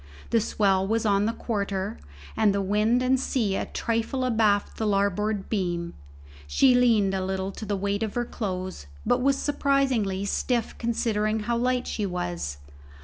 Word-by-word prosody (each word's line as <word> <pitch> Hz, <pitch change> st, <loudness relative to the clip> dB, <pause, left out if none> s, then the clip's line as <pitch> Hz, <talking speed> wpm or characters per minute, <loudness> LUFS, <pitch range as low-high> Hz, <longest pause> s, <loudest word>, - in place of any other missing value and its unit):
The 230 Hz, -, +4 dB
swell 195 Hz, -3 st, +1 dB
was 225 Hz, +2 st, 0 dB
on 200 Hz, -1 st, +3 dB
the 225 Hz, -, +1 dB
quarter, 200 Hz, -, -3 dB, 0.4 s
and 205 Hz, -2 st, +3 dB
the 200 Hz, -, +1 dB
wind 215 Hz, +5 st, +2 dB
and 260 Hz, +1 st, +3 dB
sea 225 Hz, -7 st, 0 dB
a -, -, -2 dB
trifle 230 Hz, +3 st, -1 dB
abaft 220 Hz, -4 st, +2 dB
the 220 Hz, -, -1 dB
larboard 200 Hz, 0 st, 0 dB
beam; 175 Hz, -5 st, -2 dB, 0.5 s
she 260 Hz, -, +4 dB
leaned 225 Hz, -6 st, +4 dB
a 190 Hz, -1 st, -1 dB
little 190 Hz, 0 st, -2 dB
to 215 Hz, -, -7 dB
the 205 Hz, -1 st, -1 dB
weight 200 Hz, +1 st, -1 dB
of 220 Hz, -2 st, -2 dB
her 240 Hz, 0 st, 0 dB
clothes, 185 Hz, -, -5 dB, 0.2 s
but -, -, +2 dB
was 275 Hz, +1 st, +3 dB
surprisingly 265 Hz, -10 st, +1 dB
stiff 235 Hz, +3 st, -1 dB
considering 220 Hz, -2 st, 0 dB
how 235 Hz, +3 st, -1 dB
light 250 Hz, +1 st, 0 dB
she 210 Hz, -2 st, -2 dB
was. 85 Hz, -, -3 dB
210 Hz, 165 wpm, -26 LUFS, 195-235 Hz, 0.5 s, The